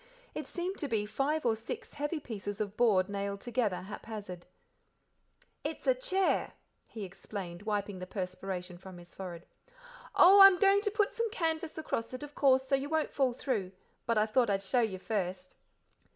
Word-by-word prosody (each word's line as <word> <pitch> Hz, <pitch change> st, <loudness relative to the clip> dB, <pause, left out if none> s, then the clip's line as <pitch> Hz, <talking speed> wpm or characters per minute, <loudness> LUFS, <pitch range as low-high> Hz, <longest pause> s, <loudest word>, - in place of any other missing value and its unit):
It -, -, -5 dB
seemed 365 Hz, +2 st, -4 dB
to 290 Hz, -, -2 dB
be 220 Hz, -5 st, 0 dB
five 275 Hz, +8 st, -1 dB
or 230 Hz, -2 st, +3 dB
six 225 Hz, +2 st, -7 dB
heavy 295 Hz, +2 st, -2 dB
pieces 205 Hz, -6 st, -6 dB
of 205 Hz, -1 st, -3 dB
board 205 Hz, -6 st, +4 dB
nailed 200 Hz, 0 st, -3 dB
together 220 Hz, -7 st, -1 dB
haphazard. 200 Hz, -3 st, -8 dB, 1.2 s
"It's -, -, -5 dB
a -, -, +5 dB
chair," -, -, 0 dB, 0.4 s
he 220 Hz, -, -7 dB
explained, 185 Hz, -2 st, -7 dB
wiping 205 Hz, -2 st, -2 dB
the 185 Hz, -, -6 dB
perspiration 185 Hz, -2 st, -5 dB
from 190 Hz, -1 st, -11 dB
his 175 Hz, 0 st, -14 dB
forehead. 175 Hz, -3 st, -7 dB, 0.7 s
"Oh! 385 Hz, +3 st, +8 dB
I'm 390 Hz, -1 st, +10 dB
going 395 Hz, +1 st, +5 dB
to 415 Hz, -, 0 dB
put 415 Hz, 0 st, +1 dB
some 460 Hz, 0 st, -1 dB
canvas 325 Hz, -6 st, -2 dB
across 255 Hz, -6 st, -3 dB
it, 255 Hz, -, -7 dB
of 295 Hz, 0 st, -9 dB
course, 265 Hz, -2 st, +3 dB
so -, -, -3 dB
you 275 Hz, +1 st, +1 dB
won't 315 Hz, -1 st, 0 dB
fall 265 Hz, -3 st, +2 dB
through; 215 Hz, -7 st, -2 dB, 0.3 s
but 230 Hz, -1 st, +2 dB
I 215 Hz, -, +4 dB
thought 235 Hz, +1 st, +2 dB
I'd 195 Hz, -1 st, 0 dB
show 240 Hz, +6 st, +2 dB
it 225 Hz, -, +1 dB
you 190 Hz, -, -5 dB
first." 185 Hz, -2 st, -3 dB
220 Hz, 180 wpm, -31 LUFS, 195-295 Hz, 1.2 s, I'm